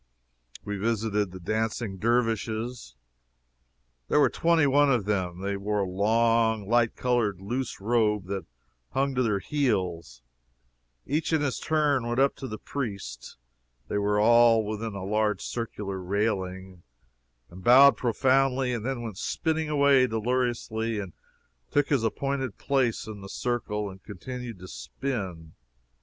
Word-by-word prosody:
We 105 0 -3
visited 105 -2 0
the 95 - -9
Dancing 110 +1 -2
Dervishes. 115 - -1 1.1
There - - +3
were - - +4
twenty 165 -2 +3
one 140 +1 +4
of 120 -6 +1
them. 95 -4 -2
They 100 0 -2
wore 105 +1 -1
a 95 - -1
long, 110 +2 +2
light 120 0 +2
colored 120 -7 0
loose 120 +6 -4
robe 105 -2 +1
that 95 0 -5 0.5
hung 135 +1 +1
to 130 - +1
their 110 -5 +1
heels. 95 - -2 0.8
Each 150 +5 -1
in 160 -2 +2
his 140 -3 -1
turn 145 -6 +1
went 120 +2 -1
up 140 +1 +3
to 135 - -6
the 110 - -6
priest 100 - -6 0.5
(they 105 - 0
were 105 0 +1
all 115 0 +5
within 110 0 -4
a 95 -1 -5
large 105 -1 0
circular 105 -5 -4
railing) 95 -2 -2 0.7
and 90 +2 -11
bowed 135 +5 +8
profoundly 130 +1 +2
and 115 -3 -3
then 125 -1 -3
went 110 -5 -6
spinning 160 -1 -1
away 140 -3 +4
deliriously 115 -1 -1
and 95 -4 -6 0.6
took 145 -1 +1
his 140 -6 +2
appointed 135 0 -2
place 130 -5 0
in 105 -2 -8
the 95 - -9
circle, 105 -4 -2
and 95 -1 -10
continued 125 +3 -7
to 90 +1 -11
spin. 95 - -5
115 Hz, 145 wpm, -27 LUFS, 100-125 Hz, 1.1 s, bowed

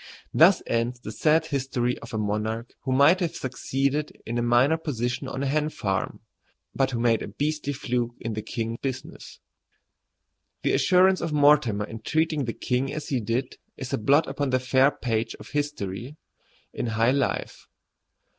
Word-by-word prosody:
Thus - - +6
ends 120 +1 -1
the 110 - -7
sad 155 +8 +2
history 130 -5 -1
of 115 - -10
a 110 - -3
monarch 110 +2 -2
who 130 - -1
might 140 +7 +5
have 175 -4 -2
succeeded 135 +3 -1
in 120 +1 -2
a - - +1
minor 120 +6 +4
position 125 -4 -3
on 135 +1 -4
a - - 0
hen 150 +2 +1
farm, 95 -10 -3 0.5
but 135 -1 +1
who 120 -3 -3
made 115 -1 +2
a - - -4
beastly 145 +6 -2
fluke 120 -3 -2
in 115 -2 -4
the 110 - -3
king 115 +1 -4
business. 130 -1 -6 1.2
The - - +2
assurance 185 +7 +4
of 165 -2 -2
Mortimer 140 -8 +4
in 110 +1 -8
treating 155 +2 0
the 115 - -3
king 130 +2 -1
as 155 - -5
he 130 - +1
did 120 +4 -2 0.2
is 130 -1 -6
a - - +1
blot 140 +8 +4
upon 140 0 -2
the 130 0 +2
fair 130 +2 +4
page 115 -5 -2
of - - -11
history 145 -3 -4 0.6
in - - -3
high 115 +2 +2
life. 140 0 -2
130 Hz, 175 wpm, -26 LUFS, 115-145 Hz, 1.2 s, Thus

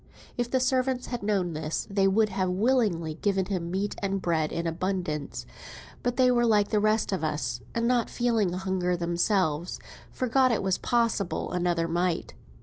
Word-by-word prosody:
If 240 -1 -1
the 260 - +2
servants 255 0 +1
had 245 -1 -4
known 195 -4 0
this, 155 +1 -3
they 195 -1 +2
would 215 +2 +3
have 185 -2 -1
willingly 185 -6 +1
given 195 -2 +1
him 180 -3 -3
meat 195 +3 -1
and 195 -1 -1
bread 160 -4 0
in 170 - -3
abundance; 165 -3 -3 0.6
but 245 0 -1
they 255 -1 +5
were 240 -1 +3
like 210 -2 +3
the 210 - +2
rest 215 +1 +1
of 190 -4 -2
us, 150 -6 -2
and 230 0 +1
not 245 -2 +2
feeling 230 -6 +1
hunger 185 -1 -1
themselves, 175 -1 0 0.3
forgot 255 +1 +2
it 225 - 0
was 190 -1 +1
possible 230 -6 0
another 175 -2 0
might. 175 +1 -1
195 Hz, 170 wpm, -27 LUFS, 175-230 Hz, 0.6 s, they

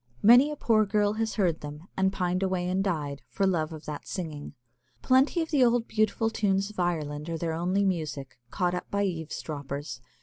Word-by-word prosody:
Many 245 +7 +8
a 300 - -4
poor 225 -6 +3
girl 205 0 +2
has 220 -1 -1
heard 175 -6 +1
them, 150 +4 -8
and 190 0 +2
pined 180 -1 -1
away 185 -2 0
and 185 +2 0
died, 145 -8 -2
for 195 - 0
love 165 -4 0
of 155 -1 -9
that 150 -1 -6
singing. 155 -5 -6 0.5
Plenty 270 +6 +3
of 320 - -8
the 285 -4 +4
old 235 -1 +2
beautiful 220 +1 +1
tunes 200 -2 0
of 210 - -10
Ireland 155 -3 -2
are 165 0 -2
only 180 +4 0
their 200 - +2
music, 150 -8 -3
caught 180 +5 0
up 180 - -4
by 200 0 0
eavesdroppers. 145 -6 -4
180 Hz, 195 wpm, -28 LUFS, 155-210 Hz, 0.5 s, Many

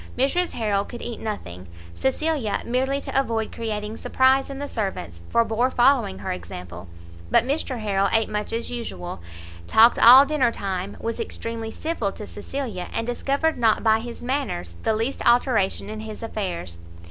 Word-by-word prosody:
Mrs 310 +8 +1
Harrel 205 -3 0
could 240 +3 -9
eat 235 - -5
nothing; 90 - -6 0.3
Cecilia, 265 - 0
merely 265 +3 0
to 270 - 0
avoid 225 -4 -2
creating 215 -1 -4
surprise 265 +1 +3
in 275 - -6
the 285 +1 -4
servants, 140 - -4
forbore 230 +2 +2
following 245 - +3
her 95 - -4
example; 90 0 -7 0.4
but - - +4
Mr 270 0 -2
Harrel 200 -2 +1
ate 225 -1 +3
much 210 0 -3
as 230 +1 -3
usual, 95 - -5 0.5
talked 225 - +6
all 255 +4 +10
dinner 275 -5 +2
time, 195 -2 -4
was 230 0 -3
extremely 230 -1 -4
civil 235 -6 -2
to 210 - -8
Cecilia, 210 -4 -5
and 225 - -2
discovered 275 +6 0
not 225 -2 +3
by 220 -1 +4
his 235 +1 -8
manners 245 - -2
the 220 - +1
least 230 +5 -2
alteration 235 -6 +2
in 215 +1 -6
his 220 0 -7
affairs. 175 - -4
225 Hz, 160 wpm, -24 LUFS, 200-260 Hz, 0.5 s, all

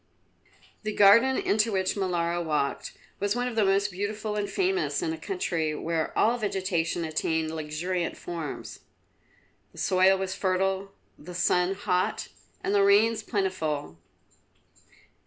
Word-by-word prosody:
The 215 -1 -3
garden 230 +7 +6
into 215 +2 +1
which 190 -1 0
Molara 175 -3 -1
walked 150 -3 -2 0.2
was 205 +2 0
one 245 0 -1
of 245 - -4
the 220 - +3
most 200 +1 +2
beautiful 210 +3 -3
and 205 -1 -2
famous 375 -1 0
in 325 -2 -1
a - - -5
country 165 - -2
where 165 0 -2
all 235 +3 +3
vegetation 185 -5 -1
attained 160 0 -1
luxuriant 160 +3 -3
forms. 165 -4 -6 0.9
The - - -18
soil 190 +1 +4
was 190 0 -3
fertile, 190 +1 0 0.3
the 175 +4 -10
sun 180 +1 +2
hot, 185 -2 -1 0.3
and 200 - 0
the 200 - +4
rains 210 +3 +4
plentiful. 160 - -2
190 Hz, 135 wpm, -27 LUFS, 170-210 Hz, 0.9 s, garden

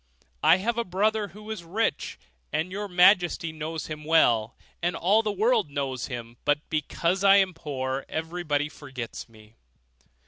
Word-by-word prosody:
I - - +6
have 230 +5 -1
a - - +1
brother, 210 +3 0
who 210 +2 -10
is 210 -6 -5
rich, 195 +1 -2 0.3
and 160 +5 -1
your 205 +2 -4
majesty 180 -2 +4
knows 160 0 -5
him 155 -1 -7
well, 120 -8 +3 0.3
and 175 0 0
all 195 +6 +3
the 215 -2 -1
world 215 -2 +2
knows 135 -3 -3
him; 120 -2 -7
but 145 +1 0
because 170 +4 -1
I 195 0 +7
am 190 -2 +3
poor, 135 -4 -4
everybody 160 -3 -2
forgets 130 -6 -8
me. 110 -1 -18
165 Hz, 160 wpm, -26 LUFS, 145-195 Hz, 0.3 s, I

